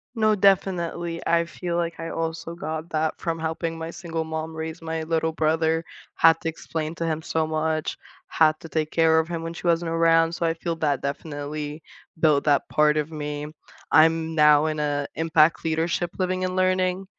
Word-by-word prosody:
No, 215 -1 +3
definitely, 175 -4 +1
I 170 0 +3
feel 170 0 -5
like 170 -1 -2
I 165 0 -4
also 165 0 -4
got 160 0 -5
that 155 0 -1
from 165 -1 -2
helping 165 +1 -3
my 165 0 -5
single 170 -1 -4
mom 160 0 -5
raise 160 0 -5
my 160 0 -3
little 160 0 0
brother 160 +1 +1 0.3
had 165 -1 +5
to 165 - -1
explain 160 0 -5
to 165 - -3
him 160 -1 -1
so 160 0 -1
much, 155 0 -1 0.3
had 155 -1 +3
to 165 - -10
take 155 -1 -1
care 160 -1 +4
of 160 - -1
him 165 -1 -4
when 165 0 -5
she 175 - -5
wasn't 170 0 +1
around, 165 0 +4
so 170 - -2
I 165 - +2
feel 165 0 -3
that 145 -4 0
definitely 145 +1 -5 0.4
built 150 -3 +3
that 145 -2 +2
part 150 0 +3
of 150 +1 -1
me. 150 -1 -4 0.4
I'm 160 +1 +4
now 150 -1 +5
in 155 -1 -2
a 145 -1 -1
impact 160 0 +3
leadership 165 +2 0
living 185 0 -1
and 185 0 -3
learning, 185 0 +1
160 Hz, 190 wpm, -24 LUFS, 155-170 Hz, 0.4 s, had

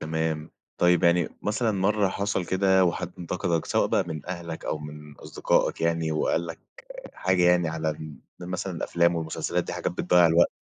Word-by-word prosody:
تمام، 80 0 -2 0.3
طيب 90 -1 +4
يعني 85 0 +3
مثلًا 110 +3 0
مَرّة 100 +1 +1
حصل 100 -1 -2
كده 95 +1 +3
وحد 85 0 -2
انتقدك، 85 -1 -2
سواء - - +2
بقى - - +1
من 80 -3 -6
أهلك 85 -3 -6
أو 75 - -2
من 75 0 -10
أصدقائك - - 0
يعني 80 -1 0
وقال 80 +2 0
لك 85 -1 -7 0.6
حاجة 95 -1 +1
يعني 90 -1 +4
على 80 0 -2
ال 75 -1 -7 0.2
مثلًا 90 +1 -4
الأفلام 85 +1 +1
والمسلسلات 80 -1 -2
دي - - -6
حاجات - - -2
بتضيّع 90 -1 +4
الوقت؟ 85 +1 +4
85 Hz, 170 wpm, -26 LUFS, 80-90 Hz, 0.6 s, طيب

